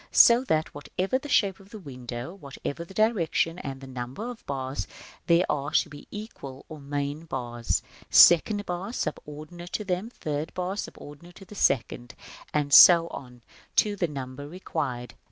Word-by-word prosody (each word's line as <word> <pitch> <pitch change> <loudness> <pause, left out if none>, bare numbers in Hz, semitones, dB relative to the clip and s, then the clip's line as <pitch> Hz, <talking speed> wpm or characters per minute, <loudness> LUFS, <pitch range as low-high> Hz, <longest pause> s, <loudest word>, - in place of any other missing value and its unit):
So 235 +2 +7
that, 160 -7 0
whatever 185 - -2
the 295 - -9
shape 200 -7 +2
of 195 0 -17
the 215 - -9
window, 125 - -7
whatever 145 -2 -6
the 185 +3 -14
direction 180 -6 +1
and 135 -1 -7
number 130 - -5
of 240 - -10
the - - -28
bars, 135 0 -4 0.4
there 170 +1 +4
are 145 -1 -1
to - - +2
be 145 -1 -12
central 175 - -9
or 155 -1 -9
main 145 +2 -4
bars; 120 -5 -2 0.3
second 205 +5 +6
bars 180 +6 -4
subordinated 155 +4 -6
to 210 - -1
them; 185 +4 -2
third 155 -8 -4
bars 185 +3 -2
subordinated 150 +5 -11
to 195 - -13
the 200 - -13
second, 120 - 0 0.4
and 145 -2 -1
so 170 +3 +9
on 125 -2 -10 0.3
to 210 -1 +3
the 180 -3 0
number 140 -1 -7
required. 145 -8 -4
155 Hz, 165 wpm, -27 LUFS, 140-190 Hz, 0.4 s, so